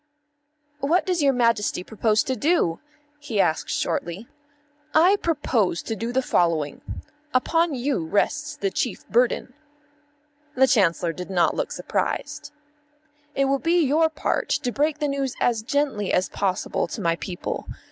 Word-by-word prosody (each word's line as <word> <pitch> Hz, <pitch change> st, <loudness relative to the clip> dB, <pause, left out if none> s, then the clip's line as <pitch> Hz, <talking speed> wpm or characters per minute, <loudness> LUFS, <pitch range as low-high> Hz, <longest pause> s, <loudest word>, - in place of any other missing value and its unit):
"What 315 Hz, +6 st, +2 dB
does 360 Hz, -3 st, 0 dB
your 280 Hz, -1 st, +4 dB
Majesty 230 Hz, -7 st, +1 dB
propose 220 Hz, +1 st, +1 dB
to 260 Hz, -, -2 dB
do?" 280 Hz, -, +1 dB, 0.4 s
he 245 Hz, -8 st, -3 dB
asked 160 Hz, -4 st, +1 dB
shortly. 175 Hz, +7 st, -2 dB, 0.7 s
"I 360 Hz, +6 st, +6 dB
propose 260 Hz, -, 0 dB
to 225 Hz, -, -3 dB
do 230 Hz, +3 st, -3 dB
the 260 Hz, +1 st, +1 dB
following. 165 Hz, -, +1 dB, 0.5 s
Upon 330 Hz, +4 st, +2 dB
you 255 Hz, -, -1 dB
rests 295 Hz, -, 0 dB
the 195 Hz, -1 st, -1 dB
chief 215 Hz, +2 st, -3 dB
burden." 245 Hz, +1 st, +1 dB, 1.0 s
The 265 Hz, +1 st, +5 dB
Chancellor 180 Hz, -8 st, +2 dB
did 180 Hz, +3 st, -7 dB
not 180 Hz, -2 st, +2 dB
look -, -, -2 dB
surprised. -, -, -3 dB, 0.8 s
"It 275 Hz, -, +2 dB
will 275 Hz, 0 st, +1 dB
be 335 Hz, +1 st, +2 dB
your 315 Hz, +4 st, +3 dB
part 315 Hz, -, -2 dB
to 245 Hz, -, 0 dB
break 295 Hz, +3 st, 0 dB
the 295 Hz, -1 st, -1 dB
news 275 Hz, -2 st, -2 dB
as 230 Hz, -3 st, +1 dB
gently 245 Hz, -5 st, -1 dB
as 185 Hz, -, +1 dB
possible 190 Hz, -2 st, -1 dB
to -, -, -6 dB
my 170 Hz, -4 st, +1 dB
people. 180 Hz, 0 st, -5 dB
245 Hz, 145 wpm, -24 LUFS, 195-290 Hz, 1.0 s, I